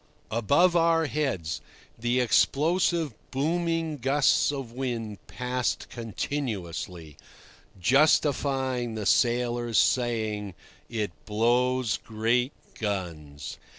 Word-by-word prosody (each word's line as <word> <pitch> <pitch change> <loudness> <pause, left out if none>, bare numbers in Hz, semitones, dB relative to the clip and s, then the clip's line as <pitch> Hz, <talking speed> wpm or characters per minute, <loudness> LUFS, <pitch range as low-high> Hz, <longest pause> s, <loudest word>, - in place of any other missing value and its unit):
Above 140 - +3
our 165 -1 +4
heads 135 - -2 0.3
the 120 +2 0
explosive 160 +5 +2 0.2
booming 165 +2 -1
gusts 135 +3 +3
of 135 -5 -5
wind 120 -5 -4
passed 125 0 -2
continuously, 100 - -4 0.6
justifying 130 - +2
the 110 -2 -4
sailor's 120 0 +2
saying 110 -3 +1 0.3
"It 110 -5 -2 0.2
blows 120 +2 +2
great 115 +4 0 0.3
guns." 80 -9 -4
120 Hz, 85 wpm, -27 LUFS, 110-140 Hz, 0.6 s, our